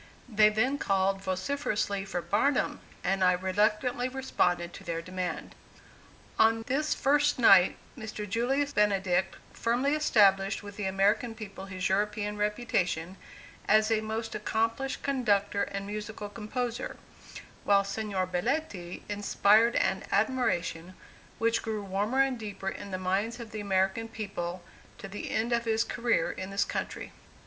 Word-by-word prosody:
They 215 -3 +5
then 250 +7 +1
called 195 0 +1
vociferously 200 0 -1
for 175 -3 -3
"Barnum," 210 +11 +1 0.2
and 195 0 +1
I 180 0 +5
reluctantly 210 +7 +1
responded 175 -10 0
to - - -10
their 170 -2 -3
demand. 180 0 -4 0.9
On 225 0 +4
this 290 +6 0
first 290 +1 +2
night, 195 -7 +6 0.2
Mr. 215 -1 -6
Julius 265 +7 0
Benedict 195 -3 +2 0.2
firmly 245 +5 +1
established 200 -10 +3
with 205 -1 -9
the 205 - -4
American 200 +4 +1
people 200 -3 -8
his 185 -2 -3
European 210 +1 0
reputation, 200 -5 -1 0.5
as 215 +1 +4
a 220 -1 +2
most 220 +1 -4
accomplished 225 +5 -1
conductor 205 -7 +1
and 200 0 -5
musical 210 0 -6
composer; 235 +3 -4 0.7
while 200 -1 +4
Signor 200 -2 -2
Belletti 185 - -3
inspired 205 +2 +3
an 190 - +1
admiration 185 -6 0 0.4
which 230 0 +1
grew 215 -2 -3
warmer 205 +7 +1
and 265 -3 -2
deeper 205 -3 -4
in 200 +1 -7
the 185 - -3
minds 195 +6 -1
of 230 -2 -8
the 215 - -5
American 195 +2 0
people, 185 -5 -5 0.3
to 220 - -8
the 200 +1 -6
end 230 +2 0
of 235 0 +1
his 225 0 +2
career 235 -7 0
in 190 0 -6
this 195 +1 +1
country. - - -4
210 Hz, 140 wpm, -29 LUFS, 195-230 Hz, 0.9 s, night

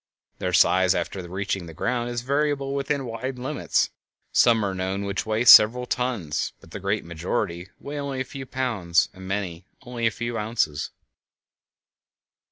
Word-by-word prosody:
Their - - -1
size 95 0 +4
after 95 - -3
reaching 95 -1 -3
the 80 - -10
ground 120 +5 -1
is 120 -1 -3
variable 140 0 0
within 140 0 -1
wide 125 +3 -4
limits; 135 +4 0 0.4
some 115 -3 +4
are 95 - -1
known 95 +1 -2
which 100 +2 -3
weigh 110 +2 0
several 120 +2 +8
tons, 120 -13 -2
but 80 - -18
the 105 - -6
great 100 +1 -1
majority 85 +1 -3
weigh 145 +1 -6
only 140 -2 -3
a - - 0
few 135 +1 -8
pounds 105 -11 +1
and 95 -1 -10
many 95 -3 -4 0.2
only 120 -2 -1
a - - +4
few 120 +1 -4
ounces. 105 -10 -1
110 Hz, 160 wpm, -25 LUFS, 95-130 Hz, 0.4 s, several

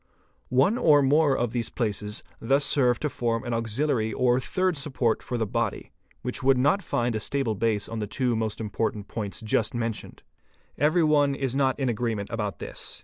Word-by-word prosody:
One 140 - +3
or 145 - +5
more 145 0 +3
of 120 -2 -1
these 120 -2 -2
places 105 -3 -2 0.2
thus 140 +4 +2
serve 125 -4 +2
to 150 - +1
form 115 -4 -1
an 120 -2 -3
auxiliary 115 0 0
or 125 +2 +2
third 185 +6 0
support 130 -6 0
for 125 - -4
the 115 - 0
body, 100 - -2 0.3
which 125 - -3
would 135 0 +4
not 145 +10 +3
find 120 - -1
a - - 0
stable 135 0 -1
base 105 -1 0
on 115 - -5
the 105 - -3
two 125 +2 0
most 110 -1 -2
important 105 -1 -2
points 105 -3 -5
just 110 +2 0
mentioned. 115 -2 -4 0.6
Kvery 155 +2 +3
one 145 -2 +3
is 135 -2 -2
not 135 -1 +1
in 135 - 0
agreement 115 -3 -2
about 105 -3 -3
this. - - -4
120 Hz, 190 wpm, -26 LUFS, 110-140 Hz, 0.6 s, or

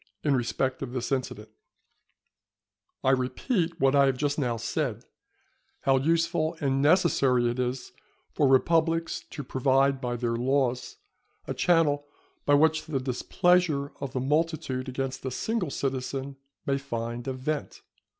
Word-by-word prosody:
In 145 - +2
respect 130 +1 -1
of 130 -2 -5
this 125 +1 -3
incident 115 -5 -3 1.5
I 130 - +4
repeat 165 - -1
what 135 -1 +3
I 140 -1 +5
have 135 -1 +1
just 145 +2 -1
now 120 -4 0
said, 115 0 -3 0.8
how 135 -1 +3
useful 165 +2 +1
and 135 -2 +1
necessary 140 -6 +3
it 120 +1 -2
is 125 +1 -2 0.4
for 145 - +3
republics 165 +4 +2
to 145 - -6
provide 135 +1 +2
by 120 -1 -2
their 120 -1 -1
laws 125 0 0 0.5
a - - -3
channel 150 -4 +2 0.4
by 145 - +6
which 160 +1 +3
the 145 -4 -1
displeasure 145 +3 +1
of 135 -2 -4
the 130 - -1
multitude 140 -2 -1
against 130 0 -4
a 130 - -2
single 195 - -2
citizen 135 0 -3 0.3
may 140 0 0
find 120 -2 -5
a 135 - -1
vent. 140 +4 -4
135 Hz, 140 wpm, -27 LUFS, 130-155 Hz, 1.5 s, by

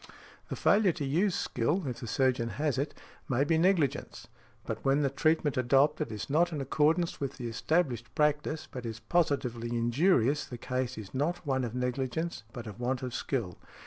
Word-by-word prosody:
The - - -3
failure 200 -3 +4
to 155 -4 -4
use 170 +8 +1
skill, 150 +10 0
if 125 -3 -4
the 120 - -6
surgeon 125 -1 +1
has 145 -3 0
it, 145 - -2 0.3
may 130 +1 +2
be 160 +2 +2
negligence; 170 -6 +1 0.4
but - - -4
when 140 +2 +3
the 135 - +1
treatment 155 0 +1
adopted 140 +3 +3
is 105 -2 -5
not 170 +5 +2
in 155 - -3
accordance 155 +5 +1
with 140 -1 -3
the 120 - -4
established 120 -2 -1
practice, 150 +1 +1
but 125 - -6
is 115 -1 -5
positively 120 -3 0
injurious, 125 +4 +2
the 120 - -8
case 125 +1 -3
is 105 -3 -8
not 165 +6 -1
one 130 -2 0
of 120 -1 -4
negligence, 125 +4 -2
but 120 -1 -7
of 105 +1 -8
want 125 +1 -1
of 125 -2 -4
skill. 115 -9 -3
135 Hz, 180 wpm, -30 LUFS, 120-155 Hz, 0.4 s, failure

